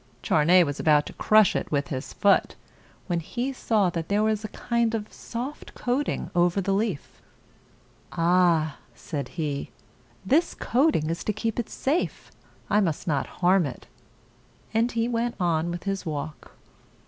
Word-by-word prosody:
Charney 175 +4 +5
was 145 -3 -3
about 150 -2 +4
to - - -8
crush 215 -2 +4
it - - -2
with 145 -1 0
his 130 -3 -4
foot, 200 -1 +2 0.5
when 175 -3 -1
he 245 - -3
saw 210 -7 +1
that 165 -1 -4
there 205 +1 +2
was 215 -1 0
a - - -3
kind 235 +1 -1
of 215 -1 -5
soft 250 +5 -7
coating 255 +4 -2
over 175 +2 +2
the 195 0 0
leaf. 200 -7 -2 0.9
"Ah!" 170 -3 +2 0.2
said 140 -6 -5
he. 145 -4 -2 0.6
"This 315 - +2
coating 245 - +1
is 170 - -4
to 215 - 0
keep 225 +2 -2
it 235 - -3
safe. 300 +7 -2 0.4
I 210 - +3
must 170 -6 -1
not 145 -4 0 0.2
harm 180 -2 +4
it." 125 - -9 0.9
And 230 +2 +2
he 230 0 0
went 235 0 -1
on 170 -2 +1
with 175 0 -5
his 195 -1 -2
walk. 155 -2 -6
190 Hz, 160 wpm, -26 LUFS, 160-225 Hz, 0.9 s, Charney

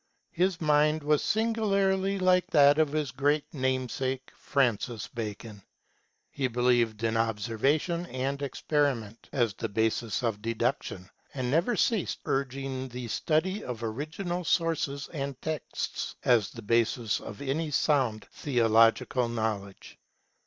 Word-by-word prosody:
His 180 0 +1
mind 150 0 +3
was 150 0 +3
singularly 200 -3 +1
like 185 -1 +3
that 145 0 +5
of 155 -2 +3
his 150 -4 -1
great 145 +4 +1
namesake, 130 -1 -2
Francis 120 -4 0
Bacon; 110 -2 -6 0.7
he 135 -2 -1
believed 120 -2 +1
in 115 0 +1
obser 115 -1 -1
vation 170 +6 +1
and 135 +2 -2
experiment 135 -6 -1
as 120 -6 +1
the - - -4
basis 110 +2 0
of 110 -3 -1
deduction, 110 -4 -2 0.3
and 125 -2 -2
never 170 - +2
ceased 220 -7 +1
urging 135 0 -2
the 125 -1 -7
study 185 - 0
of 120 -2 -5
original 160 - -3
sources 160 -5 0
and 140 -4 -5
texts, 155 -1 -4
as 115 -6 +4
the 115 - -10
basis 115 0 +1
of 105 - -9
any 145 +3 -2
sound 130 -7 +1
theological 115 -1 +3
knowl 110 -3 -1
edge. 95 - -15
135 Hz, 130 wpm, -28 LUFS, 115-155 Hz, 0.7 s, that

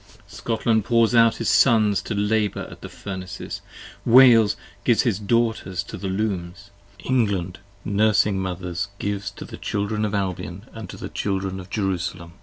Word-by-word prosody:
Scotland 115 -1 0
pours 115 +1 +3
out 115 -1 +5
his - - -3
Sons 110 -5 +4
to 110 - -4
labour 105 0 0
at - - -12
the - - -8
Furnaces: 95 -2 -7 0.4
Wales 115 -3 +6 0.3
gives 120 0 +3
his 110 -5 0
Daughters 110 -4 0
to - - -9
the 100 - -5
Looms; 95 -1 -3 0.3
England, 100 -8 0 0.3
nursing 105 -1 +2
Mothers 90 0 -3
Gives 100 -1 -3
to 100 - -10
the - - -9
Children 105 +1 -2
of 105 -1 -1
Albion 95 0 -3
& 110 -3 -7
to - - -9
the - - -6
Children 95 -1 -2
of 90 0 -10
Jerusalem. 90 -4 -3
100 Hz, 155 wpm, -23 LUFS, 95-110 Hz, 0.4 s, Wales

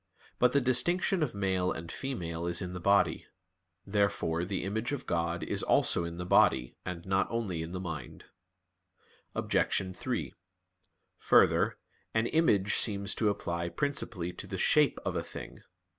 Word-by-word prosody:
But 125 0 +4
the 140 - +4
distinction 170 +9 +3
of 145 -9 -1
male 95 -2 0
and 80 0 -6
female 85 -11 -4
is 85 - +1
in 90 -2 -5
the 90 - -5
body. 100 +3 +2 0.6
Therefore 100 -5 0
the 95 +1 -3
image 110 +6 -2
of 145 -2 -4
God 85 0 -1
is - - -1
also 85 - +2
in 85 0 -6
the 90 - -4
body, 60 -7 +3
and 85 -1 -6
not 95 0 +1
only 105 -8 -2
in 80 +1 -6
the 90 - -4
mind. 80 -7 -7 1.1
Obj. 95 -1 0
3: - - -3 0.9
Further, - - +4 0.4
an 110 +1 +2
image 105 - +2
seems 100 -2 +2
to 110 - +1
apply 85 -4 -2
principally 95 - -2
to - - -8
the - - -5
shape - - +3
of - - -2
a - - 0
thing. - - -9
95 Hz, 160 wpm, -30 LUFS, 85-110 Hz, 1.1 s, But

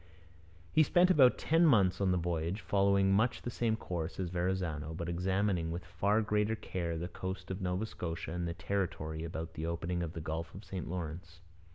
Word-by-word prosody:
He 155 - +5
spent 175 +4 +5
about 130 -7 +6
ten 165 +2 +3
months 105 - +4
on 95 - +3
the 90 - +2
voyage, 85 +3 -1
following 100 -1 +3
much 110 +5 +2
the 120 - -3
same 115 -1 +1
course 85 -5 -4
as 90 -2 -2
Verrazano, 85 -4 -1
but 85 0 -4
examining 90 0 0
with 85 +1 -4
far 100 +5 +1
greater 105 +1 +1
care 85 -6 -3
the 85 +2 -3
coast 95 0 -5
of 95 +1 -4
Nova 90 +3 -1
Scotia 85 -6 -5
and 90 0 -2
the 85 - -3
territory 80 -6 -2
about 80 0 -5
the 80 +1 -4
opening 85 +1 -2
of 85 -1 -3
the - - -5
Gulf 80 +1 -4
of 100 - -9
St 95 -4 -5
Lawrence. 85 0 -5
90 Hz, 195 wpm, -33 LUFS, 85-100 Hz, -, about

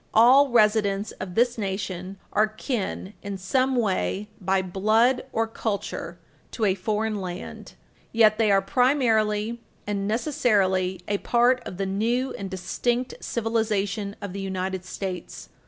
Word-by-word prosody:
All 260 +5 +7
residents 210 -3 +2
of 185 -2 -6
this 240 0 +2
nation 190 -1 -4 0.2
are 215 +1 +4
kin 215 -3 -4
in 200 -1 -5
some 255 +8 +1
way 210 -2 0
by 190 +1 +1
blood 215 +7 +2
or 225 - +1
culture 215 -2 -4 0.4
to 225 - 0
a 195 - +3
foreign 210 +2 -2
land. 180 -1 -7 0.4
Yet 220 -1 +4
they 220 -2 +3
are 195 -1 +4
primarily 230 -2 +2 0.2
and 200 -1 -2
necessarily 195 - +1
a 205 -1 0
part 245 +1 +3
of 180 - -7
the 195 - -1
new 230 +7 0
and 195 -1 -6
distinct 240 +7 -2
civilization 215 -3 -1
of 200 -3 -5
the 200 - -4
United 190 -1 -3
States. 185 -1 -6
210 Hz, 140 wpm, -25 LUFS, 195-230 Hz, 0.4 s, All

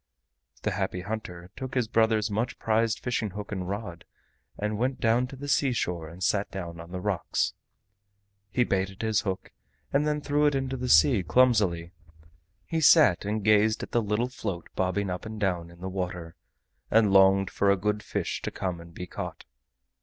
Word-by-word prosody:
The - - 0
Happy 90 - -2
Hunter 95 -4 -6
took 130 -1 -6
his 125 -3 +1
brother's 110 -1 +2
much 110 +4 -1
prized 115 0 +1
fishing 120 -3 -2
hook 105 +2 -7
and 95 -3 -3
rod 100 -4 -5 0.5
and 105 0 -2
went 130 +2 0
down 120 +2 +2
to 135 - -10
the 140 +2 -7
seashore 105 - 0
and 90 +3 -8
sat 100 +3 +1
down 85 -3 -6
on 85 +1 -10
the 90 - -4
rocks. 95 -2 -1 1.0
He 125 - +2
baited 95 -1 -2
his 110 -2 +2
hook 95 -2 -4 0.4
and 145 +2 +2
then 150 0 0
threw 145 0 +2
it 145 - +1
into 135 -1 -1
the 125 -1 -3
sea 95 - +6
clumsily. 90 -4 +2 0.7
He 165 -1 -1
sat 140 - +6
and 105 0 -2
gazed 110 +1 +4
at - - -7
the 120 - +2
little 105 +3 0
float 100 -9 -5
bobbing 95 +1 0
up 90 - -4
and 110 0 -7
down 90 -4 -1
in 85 0 -16
the 95 - -4
water, 90 -3 -4 0.5
and 105 -3 +4
longed 95 0 +5
for 100 - +1
a 100 - +4
good 105 +2 -1
fish - - -3
to - - -3
come 90 -3 -4
and 85 0 -14
be 90 - -5
caught. - - -7
105 Hz, 185 wpm, -27 LUFS, 90-115 Hz, 1.0 s, sea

